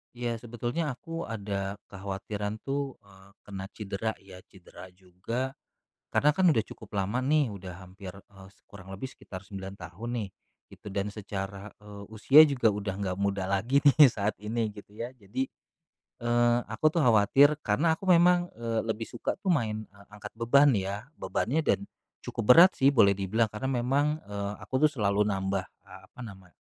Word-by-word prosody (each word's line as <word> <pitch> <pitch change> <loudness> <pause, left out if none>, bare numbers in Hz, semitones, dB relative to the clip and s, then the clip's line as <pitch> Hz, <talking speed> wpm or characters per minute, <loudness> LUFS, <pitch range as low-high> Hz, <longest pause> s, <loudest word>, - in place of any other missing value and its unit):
Iya, 120 -1 -3
sebetulnya 120 +5 -3
aku 165 +5 -6
ada 100 -3 -4 0.2
kekhawatiran 100 +2 -5
tuh, 140 -1 -3
eee, 95 -1 -19
kena 95 -2 -7
cedera 105 +1 -3
ya, 95 -1 -12
cedera 95 -1 -14
juga. 95 +8 -5 0.6
Karena 150 - +3
kan 185 +4 +2
udah 115 -9 +3
cukup 110 -1 -13
lama 100 +5 -1
nih, 140 -1 +2
udah 90 -3 -8
hampir, 95 0 -10
eee, 95 -1 -15 0.2
kurang 95 -2 -14
lebih 130 +7 -6
sekitar 95 0 -10
9 95 -1 -8
tahun 90 +6 -8 0.2
nih, - - -8 0.4
gitu. - - -16
Dan 100 +1 -3
secara, 100 -1 -6
eee, 105 -1 -11
usia 110 +7 +6
juga 125 -6 +2
udah 100 -1 -4
nggak 95 -2 -3
muda 100 -1 0
lagi 110 +10 +1
nih 145 0 +8
saat 105 -2 -2
ini, 110 +1 -2
gitu 105 0 -14
ya. 120 +3 -5
Jadi, 120 +2 -4 0.8
eee, 120 0 +3
aku 110 - -4
tuh 165 +2 +2
khawatir, 130 +6 +5
karena 150 +8 +1
aku 190 - -9
memang, 175 0 +5
eee, 115 -1 -2
lebih 110 0 -3
suka 120 - -3
tuh 190 - +2
main 110 -8 0 0.3
angkat 105 0 -9
beban, 140 +5 +5
ya, 100 +1 -3 0.2
bebannya 145 +6 -1 0.7
cukup - - -4
berat 180 +3 +9
sih. 135 - +4
Boleh 115 -8 +5
dibilang 100 +4 0
karena 120 +5 -3
memang, 135 +4 +1
eee, 100 0 -4
aku 130 +1 -2
tuh - - -6
selalu 105 -7 0
nambah, 95 -1 -1 0.2
eee, - - -13
apa - - -20
namanya, 95 -5 -13
105 Hz, 165 wpm, -28 LUFS, 100-130 Hz, 0.8 s, berat